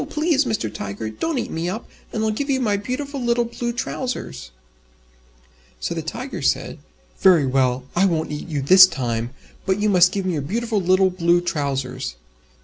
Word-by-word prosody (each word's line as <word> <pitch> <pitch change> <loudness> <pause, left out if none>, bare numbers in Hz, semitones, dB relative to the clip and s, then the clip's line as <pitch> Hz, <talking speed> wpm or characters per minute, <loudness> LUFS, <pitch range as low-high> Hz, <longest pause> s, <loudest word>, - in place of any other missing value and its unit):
Please, 305 -2 +1
Mr. 210 - -2
Tiger, 100 +2 -5
don't 305 - -2
eat 245 - -3
me 165 +2 -2
up, 215 +5 -5 0.2
and 220 - -2
I'll 220 - +1
give 280 +7 -3
you 265 -1 +2
my 215 -5 +1
beautiful 265 +7 -4
little 240 0 +1
Blue 240 +1 -3
Trousers." 245 - -4 1.3
So - - -2
the - - -3
Tiger - - -6
said, - - 0 0.4
"Very 175 -7 +5
well, 130 -1 +1
I 185 +3 +4
won't 160 -4 -1
eat 150 +3 -5
you 150 -5 -2
this 185 +6 +9
time, 120 -7 -2 0.4
but 190 +1 +1
you 210 0 +2
must 180 -2 +5
give 195 -2 -2
me 185 - 0
your 150 - -1
beautiful 220 - -1
little 185 +1 +3
Blue 175 -1 +2
Trousers." 135 - -3
185 Hz, 180 wpm, -22 LUFS, 140-235 Hz, 1.3 s, this